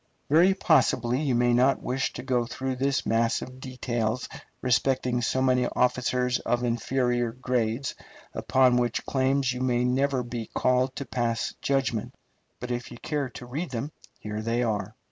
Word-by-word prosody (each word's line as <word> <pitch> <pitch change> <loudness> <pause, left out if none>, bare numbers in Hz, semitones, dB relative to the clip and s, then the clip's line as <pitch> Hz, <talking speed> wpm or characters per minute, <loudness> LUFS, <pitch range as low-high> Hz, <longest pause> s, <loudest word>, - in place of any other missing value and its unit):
Very 175 +5 +5
possibly 135 -8 +2
you 135 -5 +1
may 120 0 +3
not 130 +3 +3
wish 130 +1 -1
to - - -7
go 125 -3 0
through 130 +1 -3
this 135 +1 0
mass 115 0 +1
of 130 0 -10
details 125 -2 -2 0.4
respecting 125 0 +1
so 130 +2 +1
many 125 -1 +3
officers 125 0 +1
of 120 0 -1
inferior 120 0 0
grades, 125 0 -1 0.4
upon 130 -2 +3
whose 120 -2 0
claims 130 -1 +1
you 125 - -5
may 125 -1 +1
never 130 +1 +1
be 120 -2 -6
called 130 +1 +2
to 140 - -4
pass 115 -3 -1
judgment. 135 -5 -1 0.4
But 125 0 -5
if 120 0 -3
you 120 - -9
care 145 0 -2
to 125 - -10
read 145 +8 -4
them 130 +4 -4 0.3
here 105 0 -5
they 115 +2 0
are. 110 -4 -2
125 Hz, 165 wpm, -27 LUFS, 120-130 Hz, 0.4 s, Very